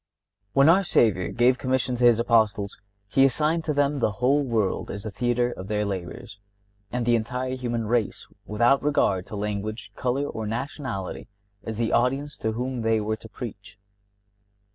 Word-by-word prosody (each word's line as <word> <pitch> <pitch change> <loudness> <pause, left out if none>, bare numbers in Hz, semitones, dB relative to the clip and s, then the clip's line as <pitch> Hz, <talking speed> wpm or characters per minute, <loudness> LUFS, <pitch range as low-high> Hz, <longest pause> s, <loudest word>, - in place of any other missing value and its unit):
(57) - - -47
When 140 +3 +6
our 190 +4 +5
Savior 95 - +2
gave 125 +1 +2
commission 130 -1 0
to 120 - +2
his 120 -2 +6
Apostles 110 -4 +2 0.3
He 135 +6 +3
assigned 155 +5 +2
to 150 - 0
them 145 0 +1
the 110 -4 +1
whole 135 +7 +2
world 110 -7 -1
as 100 0 -4
the 110 - -5
theatre 120 +4 0
of 95 -4 -8
their 105 0 0
labors, 100 +2 -6 0.5
and 125 -1 -1
the 120 0 +4
entire 125 +3 -2
human 120 -3 -2
race, 115 -1 -1 0.2
without 120 +6 +3
regard 100 -11 +1
to 110 - -7
language, 105 +2 -4
color, 130 +3 -1
or 110 -5 -4
nationality, 120 -3 -4 0.4
as 110 -1 -5
the 115 -1 0
audience 135 +4 +1
to 110 - -2
whom 125 +1 -3
they 115 0 +2
were 110 +1 -2
to - - -13
preach. - - -9
120 Hz, 175 wpm, -25 LUFS, 105-130 Hz, 0.5 s, When